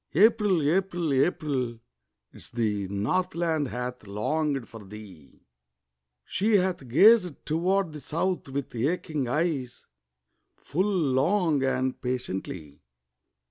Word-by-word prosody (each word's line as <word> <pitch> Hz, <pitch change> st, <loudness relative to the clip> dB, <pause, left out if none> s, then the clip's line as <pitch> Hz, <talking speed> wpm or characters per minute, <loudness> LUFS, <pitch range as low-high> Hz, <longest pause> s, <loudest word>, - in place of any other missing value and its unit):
April! 195 Hz, -5 st, +4 dB
April! 175 Hz, -2 st, 0 dB
April! 130 Hz, -4 st, 0 dB, 0.5 s
'Tis -, -, -12 dB
the 105 Hz, -4 st, -1 dB
Northland 165 Hz, -, 0 dB
hath 125 Hz, -3 st, -5 dB
longed 135 Hz, +6 st, -1 dB
for 115 Hz, -2 st, -11 dB
thee, 95 Hz, -7 st, -13 dB, 0.8 s
She 215 Hz, +4 st, 0 dB
hath 180 Hz, -7 st, -1 dB
gazed 180 Hz, -, +5 dB
toward 175 Hz, +2 st, 0 dB
the 150 Hz, -, -7 dB
South 170 Hz, +3 st, -2 dB
with 140 Hz, 0 st, -4 dB
aching 145 Hz, +2 st, -1 dB
eyes 140 Hz, -3 st, -2 dB, 0.8 s
Full 185 Hz, +8 st, 0 dB
long 160 Hz, 0 st, +2 dB
and 130 Hz, -1 st, -1 dB
patiently. 95 Hz, -, -5 dB
145 Hz, 100 wpm, -27 LUFS, 125-175 Hz, 0.8 s, gazed